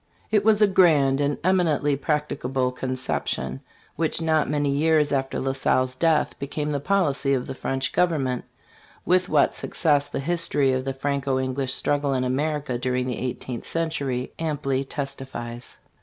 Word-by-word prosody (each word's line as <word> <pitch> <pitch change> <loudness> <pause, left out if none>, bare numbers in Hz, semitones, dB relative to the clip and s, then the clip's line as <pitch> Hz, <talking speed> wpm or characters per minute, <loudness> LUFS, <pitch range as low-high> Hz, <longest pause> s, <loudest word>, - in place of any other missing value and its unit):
It 210 -2 +3
was 215 0 +4
a - - +6
grand 150 -8 +4
and 145 0 0
eminently 165 -6 +2
practicable 135 -3 -1
conception, 125 - -3 0.4
which 160 +1 0
not 160 -1 +1
many 145 -1 +1
years 150 0 +2
after 135 -1 -1
La 135 - 0
Salle's 130 -1 +1
death 160 +3 +1
became 150 +2 -3
the 145 - -1
policy 145 -5 +1
of 125 - -2
the 135 - -5
French 130 0 -2
government, 140 -8 +1 0.6
with 185 0 +2
what 150 -2 +3
success 145 -4 +1
the - - -3
history 150 -3 +1
of 130 0 -1
the 135 - -2
Franco 140 -1 -1
English 130 0 -1
struggle 145 -1 0
in 130 - 0
America 140 0 -1
during 125 0 0
the 125 -2 -3
eighteenth 125 -1 -5
cen 165 -1 -1
century 130 -4 -2
amply 145 -4 -1
testifies. 135 -4 -6
140 Hz, 155 wpm, -24 LUFS, 130-155 Hz, 0.6 s, a